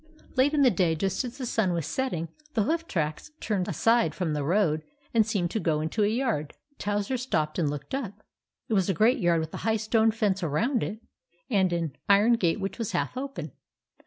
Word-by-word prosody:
Late 280 +3 +3
in 285 - +4
the 255 - +6
day, 175 -4 +2
just 190 +7 -1
as 250 +1 -6
the 260 - -4
sun 215 -6 +1
was 165 -3 -1
set 260 +11 -1
ting, 165 -6 -4 0.3
the 220 - +3
hoof 330 +7 -1
tracks 155 - -2
turned 195 -5 -1
aside 230 +1 +2
from 175 -5 -1
the 145 -1 -1
road 160 -1 +2 0.3
and 225 -2 +5
seemed 200 -5 -1
to 220 - -1
go 160 -6 +1
into 160 +8 -1
a - - +4
yard. 220 - -1 0.3
Towser 205 +5 -1
stopped 155 -11 -1
and 155 -4 +2
looked 145 - -6
up. 215 -6 -4 0.4
It - - -2
was 195 -2 +2
a 190 - +1
great 225 - +4
yard 170 -2 +3
with 160 0 -6
a - - -4
high 220 0 +1
stone 220 +1 +2
fence 210 -3 0
around 220 - +1
it, 215 +3 -4 0.5
and 190 -4 +3
an 165 -4 -1 0.2
iron 205 +4 +6
gate 190 -4 +1
which 195 +4 -4
was 230 - -3
half - - -1
open. 255 - -5
200 Hz, 215 wpm, -27 LUFS, 165-230 Hz, 0.5 s, the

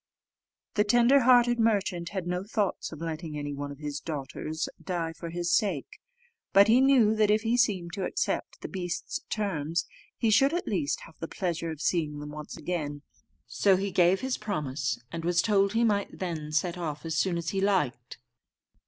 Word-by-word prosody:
The 210 - +3
tender 240 +5 +5
hearted 240 -1 +5
merchant 200 -6 +1
had 190 -3 -4
no 180 +1 -2
thoughts 205 -1 -2
of 155 -1 -9
letting 160 -1 -4
any 145 0 -4
one 145 0 -5
of 140 - -9
his 145 -1 -4
daughters 155 +1 -4 0.2
die 170 -3 -2
for 165 +1 -7
his 175 +1 -1
sake; 185 -10 0 0.5
but 200 +1 +7
he 235 +4 +5
knew 260 -6 +5
that 215 -1 +3
if 215 +1 +3
he 230 +1 +2
seemed 190 -8 +1
to 190 0 -2
accept - - -2
the - - -5
beast's 180 -3 -4
terms, 170 -6 -1 0.3
he 225 - +2
should 270 +9 +4
at 355 - -3
least 315 +11 -1
have - - -14
the - - -4
pleasure 170 -3 -3
of 160 -2 -6
seeing 155 -4 0
them 150 0 -7
once 150 0 -8
again. 150 -3 -4 0.4
So 130 - +3
he 195 +1 -2
gave 180 +1 +4
his 260 -1 -2
promise, 145 -9 -2
and 165 0 -5
was 175 0 +2
told 200 0 +3
he 230 +1 +2
might 205 -3 0
then 160 -5 -4
set 170 +3 0
off 155 -2 -4
as 160 - -2
soon 185 -3 +1
as 170 0 -3
he 195 - -1
liked. 150 -12 0
180 Hz, 190 wpm, -28 LUFS, 155-210 Hz, 0.5 s, but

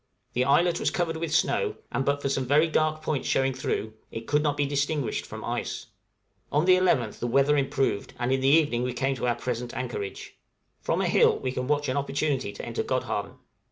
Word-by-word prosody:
The 125 +1 +1
islet 170 +5 +3
was - - +1
covered 165 -2 -1
with 165 -1 -3
snow, 420 - +1 0.2
and 135 - 0
but 140 +1 0
for 140 - 0
some 135 -2 -1
very 145 +4 +5
few 165 - -5
dark 155 0 +1
points 155 -3 -1
showing 135 0 +2
through, 110 -4 -3 0.2
it 115 0 -7
could 150 +3 +2
not 145 -1 0
be 145 - +2
distinguished 140 -2 -1
from - - -7
ice. - - -3 0.7
On 150 +3 +2
the 185 0 +7
11th 150 - +1
the 120 - -2
weather 140 +4 +3
improved, 135 -6 0
and 120 +1 -1
in 135 0 +1
the 135 - +2
evening 145 -5 +4
we 125 0 -1
came 135 +2 0
to 125 - -2
our 120 - +2
present 120 -1 -4
anchorage. 120 -6 -5 0.4
From - - 0
a - - +1
hill - - +4
we 130 - -3
can 125 0 -3
watch 145 0 +1
an 130 - -1
opportunity 140 -4 -1
to - - -8
enter - - -2
Godhavn. - - -2
140 Hz, 220 wpm, -27 LUFS, 125-150 Hz, 0.7 s, the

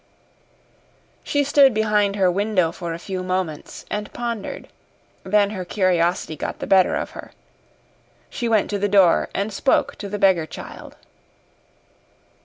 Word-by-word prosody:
She 285 0 +1
stood 280 -3 +4
behind 210 -2 +1
her 190 -3 +3
window 195 -3 +1
for 170 -1 -6
a - - -6
few 185 +1 -5
moments 185 -4 -4
and 210 0 -4
pondered. 235 -4 -5 0.6
Then 205 +1 +2
her 190 -3 -4
curiosity 175 -3 0
got - - -5
the - - -5
better 190 -1 +4
of - - -3
her. - - -11 0.9
She 240 -2 -3
went 220 -3 +2
to 205 - -1
the 205 +1 0
door 190 -4 +4
and 200 +2 -2
spoke 265 - +1
to 200 - -7
the 205 - -3
beggar 190 -5 +3
child. - - -10
200 Hz, 145 wpm, -22 LUFS, 185-210 Hz, 0.9 s, stood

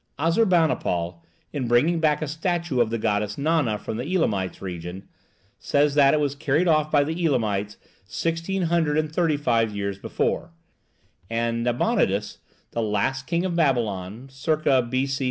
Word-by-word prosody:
Assurbanipal, 160 - +1 0.3
in 135 -5 -2
bringing 150 +9 +3
back 155 -1 +2
a - - -3
statue 165 -3 -1
of 115 - +2
the 115 - -1
goddess 105 -1 -1
Nana 145 -7 +1
from 110 +2 -5
the 145 +10 -3
Elamite 100 - 0
region, 90 +1 -7 0.5
says 145 0 +2
that 140 0 +5
it - - +1
was 145 -2 0
carried 150 +4 0
off 155 -2 +3
by 145 -2 +4
the 160 +4 -3
Elamites 105 -8 0 0.3
1635 155 - 0
years 100 -1 -3
before; 165 - -2 0.8
and 115 0 -1
Nabonidus, 120 - 0 0.3
the 115 - -2
last 120 +5 -1
king 170 +1 0
of 180 -2 -2
Babylon 115 - 0
(circa 135 -1 +1
B.C. 130 +3 -1
135 Hz, 135 wpm, -24 LUFS, 110-160 Hz, 0.8 s, that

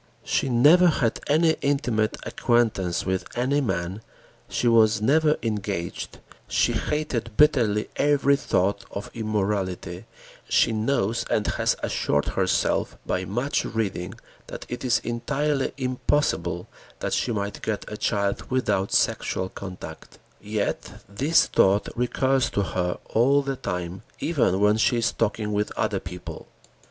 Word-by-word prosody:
She 135 - 0
never 150 +9 +6
had 130 -8 +1
any 160 +2 +3
intimate 125 -6 0
acquaintance 110 -8 0
with 95 0 -1
any 135 +4 +1
man, 95 -3 -2 0.5
she 120 - 0
was 110 -2 +5
never 150 +7 +3
engaged, 100 -6 -3 0.3
she - - +2
hated 125 -7 -2
bitterly 120 -9 +3
every 140 -1 +3
thought 100 -6 0
of 100 - -7
immorality, 100 -5 -2 0.4
she - - +3
knows 110 -1 0
and 105 - +1
has - - +1
assured 70 0 0
herself - - 0
by 95 0 -1
much 120 +10 -1
reading 95 -4 -3 0.3
that - - -8
it 125 - -5
is 125 -2 +3
entirely 135 +4 -1
impossible 125 - -1 0.3
that - - -2
she 125 - 0
might 100 -2 -3
get 110 -2 -3
a 105 - -6
child 100 -2 -1
without 105 -7 0
sexual 95 0 0
contact. 95 -2 -9 0.2
Yet 105 0 -3
this 135 +12 +3
thought 100 +2 +3
recurs 130 +2 +1
to 100 - 0
her 90 -2 -2
all 135 +5 +4
the 135 0 -2
time, 90 -5 -4 0.2
even 125 - +1
when 105 +1 +4
she 120 +2 +2
is 115 0 +1
talking 105 -1 -1
with 105 +1 -1
other - - -1
people. 90 0 -8
110 Hz, 135 wpm, -25 LUFS, 100-135 Hz, 0.5 s, never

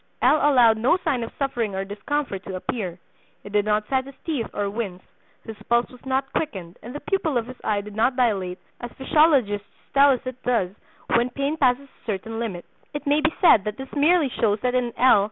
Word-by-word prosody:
L. 305 - +6
allowed 245 -7 +5
no 260 +10 +3
sign 255 -3 +1
of 230 - -4
suffering 240 -7 -1
or 195 0 -2
discomfort 205 0 -3
to 190 - -5
appear; 185 -2 -4 0.5
he - - -9
did 205 0 +1
not 210 0 +1
set 265 -1 0
his 275 - -11
teeth 290 -9 -1
or 205 -1 -2
wince; 200 -3 -4 0.4
his 225 - -8
pulse 235 0 +2
was 250 -2 -15
not 265 +1 -1
quickened, 190 - -4
and 245 +4 -9
the - - -3
pupil 330 -8 0
of 230 - -1
his 255 +1 -10
eye 205 -1 0
did 205 0 -10
not 240 +4 +2
dilate 195 -8 0 0.2
as 240 0 -6
physiologists 265 -8 +2 0.3
tell 280 +1 +6
us 260 -3 +3
it 255 0 -6
does 230 -8 +1 0.4
when 240 +1 +3
pain 280 +4 -2
passes 275 -2 +2
a - - -30
certain 225 +2 -3
limit. 195 -7 -4 0.3
It 295 - -4
may 290 +1 +3
be 315 0 +2
said 320 - +6
that 210 0 -3
this 265 0 -9
merely 305 0 +3
shows 215 -3 +1
that 250 0 0
in 250 -1 0
L. 255 -4 +6
240 Hz, 215 wpm, -24 LUFS, 210-275 Hz, 0.5 s, L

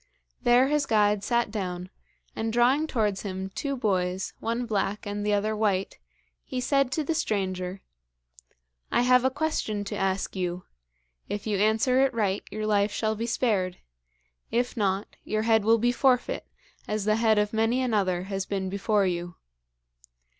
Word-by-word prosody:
There 245 +1 +5
his 295 -1 +1
guide 210 -2 +3
sat 235 0 +1
down, 185 -3 -4 0.4
and 225 0 -2
drawing 255 +7 +3
towards 210 -8 0
him 190 -1 -5
two 280 +7 -3
boys, 185 -4 -1
one 235 +2 -2
black 210 -2 -1
and 205 0 -3
the 210 0 +1
other 215 +2 0
white, 200 -3 0 0.4
he 255 - -4
said 275 +1 +1
to 310 - 0
the 325 - -1
stranger: 190 - -2 1.1
'I - - +3
have 250 0 +5
a 260 - +4
question 265 -8 -2
to 200 - -5
ask 195 0 -1
you. 180 -1 -2 0.7
If 205 0 -4
you 210 -3 0
answer 220 +5 +3
it 270 -2 +2
right, 205 -3 0
your 215 +1 -4
life 205 -1 +2
shall 220 +1 -1
be 230 +2 -3
spared. 205 -7 0 0.7
If 245 +1 0
not, 200 -3 -1
your 215 0 -1
head 220 -1 +3
will 225 +2 +5
be 240 +2 +2
forfeit, 250 0 +1 0.4
as 210 -1 -2
the 215 0 +3
head 220 -1 +3
of 210 +1 +1
many 225 +3 +2
another 200 -8 +1
has 195 0 -4
been 190 -2 -2
before 200 +1 +1
you. 175 -1 -3
215 Hz, 165 wpm, -27 LUFS, 195-240 Hz, 1.1 s, There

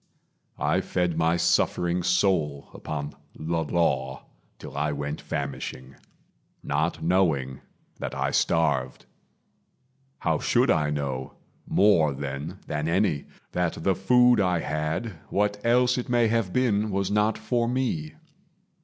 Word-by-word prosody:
I - - +1
fed 90 -2 -1
my 80 +1 +2
suffering 85 +1 +1
soul 85 -6 +1
Upon 75 -1 -5 0.2
the - - -10 0.2
Law 70 -5 0 0.3
till - - -10
I 75 +1 0
went 75 +1 -4
famishing, 65 -2 -5 0.7
Not 80 +4 -1
knowing 80 -7 +1 0.4
that - - -4
I - - -1
starved. 75 -6 +1 1.2
How - - +1
should 125 -1 +3
I 75 -2 +2
know, 70 -3 -3 0.3
More 85 -8 +4
then 70 +2 -5
than 75 0 -2
any, 85 -4 +1 0.3
that 90 -2 -2
the 95 - +3
food 125 +5 +4
I 90 -4 +2
had 80 +6 -3
What 105 +1 0
else 125 +1 +3
it 125 - -5
may 120 -2 +3
have 115 -5 0
been 110 -4 +1
was 100 -1 -1
not 105 +1 +2
for 120 -2 0
me? 120 -12 -2
85 Hz, 125 wpm, -26 LUFS, 75-105 Hz, 1.2 s, More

